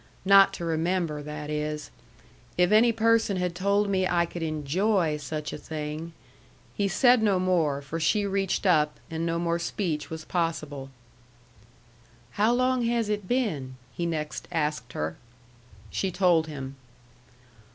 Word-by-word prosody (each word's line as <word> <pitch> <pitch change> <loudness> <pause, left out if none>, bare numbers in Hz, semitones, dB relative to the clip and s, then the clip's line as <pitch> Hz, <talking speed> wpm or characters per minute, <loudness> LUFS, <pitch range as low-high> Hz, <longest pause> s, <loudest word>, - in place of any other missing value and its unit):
"Not 195 0 +7
to 170 - -5
remember, 165 -1 -1
that 150 0 -6
is. 150 0 -3 0.7
If 180 +1 +3
any 225 +3 +6
person 225 -3 +2
had 180 -1 -1
told 200 +3 +1
me 190 -2 +1
I 170 -1 +2
could 170 0 -7
ENJOY 160 +2 0
such 150 +1 -5
a - - -6
thing 155 +2 -5 0.3
" - - -30
He 200 - +1
said 245 +5 +4
no 205 -3 +3
more, 165 -6 +1
for 155 +4 -4
she 205 +6 +2
reached 195 0 -1
up, 150 -5 +3
and 165 +1 -2
no 165 0 0
more 170 0 0
speech 170 -3 -2
was 160 -1 -7
possible. 155 -6 -2 1.4
"How 215 +3 +2
long 255 +1 +2
has 230 -2 0
it 205 -2 -2
been?" 160 - -1 0.2
he 170 - -2
next 155 -2 -4
asked 150 -7 -2
her. 80 +1 -3 0.7
She 195 - -1
told 175 -3 +3
him. 135 -3 -7
170 Hz, 150 wpm, -27 LUFS, 150-200 Hz, 1.4 s, Not